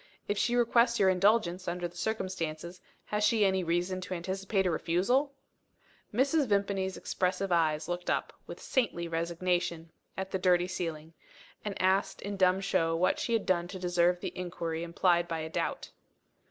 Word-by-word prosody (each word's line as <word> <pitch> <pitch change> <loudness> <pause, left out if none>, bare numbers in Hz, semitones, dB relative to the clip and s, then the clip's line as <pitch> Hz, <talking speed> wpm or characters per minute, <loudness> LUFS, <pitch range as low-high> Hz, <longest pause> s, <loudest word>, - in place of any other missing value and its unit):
If 205 - 0
she 235 +4 +1
requests 235 0 +3
your 195 -2 +5
indulgence, 185 -1 +2
under 175 0 -2
the 175 - -17
circumstances, 180 -4 -3 0.2
has 210 0 -1
she 210 0 +4
any 190 -1 +2
reason 175 +2 -1
to 185 0 -4
anticipate 190 +3 -1
a 180 - +2
refusal?" 240 - +1 0.8
Mrs. 275 +5 +2
Vimpany's 200 -2 0
expressive 185 +1 -1
eyes 160 -3 +2
looked 175 0 -3
up, - - -1
with - - -8
saintly 200 -10 -1
resignation, 170 0 -1 0.3
at 190 0 -4
the 190 - -1
dirty 180 -1 +3
ceiling 165 -3 -5 0.5
and 205 -2 -4
asked 190 +1 +1
in 200 0 -4
dumb 185 0 +3
show 165 -4 +1
what 185 +3 +2
she 235 - -1
had 225 - +1
done 175 -2 +1
to 190 +1 -7
deserve 175 0 +1
the - - -2
injury 170 -2 -4
implied 170 0 +2
by 165 -1 -3
a 160 - -5
doubt. - - -3
185 Hz, 165 wpm, -30 LUFS, 170-200 Hz, 0.8 s, your